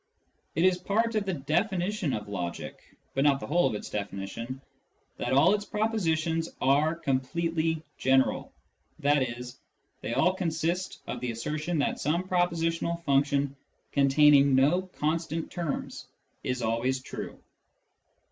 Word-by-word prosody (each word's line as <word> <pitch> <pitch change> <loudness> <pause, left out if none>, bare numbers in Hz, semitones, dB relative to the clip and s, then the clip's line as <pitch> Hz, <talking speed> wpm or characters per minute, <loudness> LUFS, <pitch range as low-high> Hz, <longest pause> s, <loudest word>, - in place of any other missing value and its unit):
It 165 +4 +3
is 185 -1 +4
part 225 +5 +1
of 215 -2 0
the 190 - 0
definition 175 +4 0
of 105 -3 -3
logic 90 -4 -6 0.2
(but 135 - +1
not 140 -2 +4
the - - -6
whole 175 +3 +3
of - - -2
its 105 - -5
definition) 105 +5 -5 0.6
that 120 - -2
all 140 +9 +5
its 210 -1 0
propositions 165 -7 0
are 145 +4 +3
completely 160 +2 -1 0.2
general, 130 0 +2 0.5
i.e. 130 -4 +1 0.6
they - - -3
all 180 +3 +4
consist 170 0 -2
of - - -4
the 125 - -3
assertion 155 +9 -2
that 140 - 0
some 165 +5 0
propositional 170 -1 0
function 140 -1 +2 0.4
con 140 -1 +4
taining 140 -1 +6
no 170 +8 +3
constant 160 +1 -1
terms 170 -5 -4 0.4
is 125 -1 -2
always 115 +4 0
true. - - -7
155 Hz, 135 wpm, -28 LUFS, 135-175 Hz, 0.6 s, taining